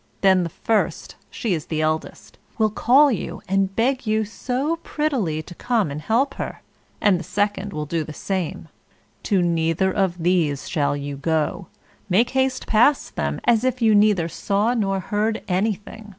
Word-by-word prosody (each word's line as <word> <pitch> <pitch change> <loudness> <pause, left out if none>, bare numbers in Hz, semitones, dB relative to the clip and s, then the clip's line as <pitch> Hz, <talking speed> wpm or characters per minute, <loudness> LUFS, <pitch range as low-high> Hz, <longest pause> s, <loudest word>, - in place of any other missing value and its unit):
Then 190 -2 +5
the 170 - -2
first 220 +6 -1 0.2
she 220 -5 -2
is 155 -3 -3
the 155 - -2
eldest 155 0 -3 0.2
will 215 -2 +2
call 270 +7 +5
out - - -6
and 195 0 0
beg 255 +1 0
you 215 0 +1
so 265 +8 -2
prettily 255 - -2
to 175 - -11
come 225 - 0
and 145 +2 -5
help 245 - +1
her; - - -6 0.4
and 195 -4 +3
the - - -6
second 205 +2 -1
will 150 -3 -4
do 160 +2 -2
the 155 - -8
same; 175 0 -4 0.5
to 190 -3 +1
neither 165 +2 +1
of 190 -3 0
these 165 -6 +1
shall 145 -3 0
you 140 0 -5
go; 160 +4 -1 0.4
make 220 +6 +3
haste 265 0 0
past 240 +7 +3
them, - - -2
as 235 -1 +3
if 255 0 0
you 225 -3 +4
neither 205 -5 +4
saw 200 +7 0
nor 195 -5 0
heard 215 +3 -1
anything. 210 +3 -2
200 Hz, 170 wpm, -22 LUFS, 170-225 Hz, 0.5 s, Then